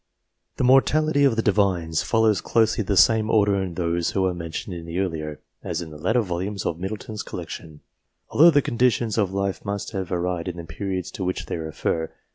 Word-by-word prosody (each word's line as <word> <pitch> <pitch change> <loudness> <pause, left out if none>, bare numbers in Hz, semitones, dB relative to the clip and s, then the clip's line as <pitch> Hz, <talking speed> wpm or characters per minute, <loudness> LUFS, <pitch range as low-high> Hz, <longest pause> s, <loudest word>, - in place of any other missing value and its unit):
The - - 0
mortality 145 +3 +4
of 130 -5 +3
the 115 - 0
Divines 95 -6 +1
follows 110 -2 +2
closely 115 -1 +2
the 100 0 0
same 110 +1 +5
order 100 -3 +3
in 90 -3 -4
those 85 -1 0
who 95 -1 0
are 90 - +1
mentioned 85 +2 -5
in 85 -1 -8
the 85 +1 -5
earlier, 80 -5 -3 0.2
as - - -3
in 85 -2 -7
the 75 - -10
later 110 +9 +2
volumes 95 0 -3
of 85 - -2
Middleton's 105 +3 -5
collection, 80 -2 -8 0.5
although 165 +4 +7
the 145 -4 +3
con 120 - -4
ditions 120 -3 +2
of 100 -3 +1
life 100 0 -2
must 100 -1 -4
have 95 -4 -4
varied 90 -1 -2
in 90 -1 -4
the 85 - -6
periods 90 +3 -4
to 95 - -5
which 90 0 -2
they - - -4
refer. 80 0 -2
95 Hz, 205 wpm, -24 LUFS, 85-110 Hz, 0.5 s, although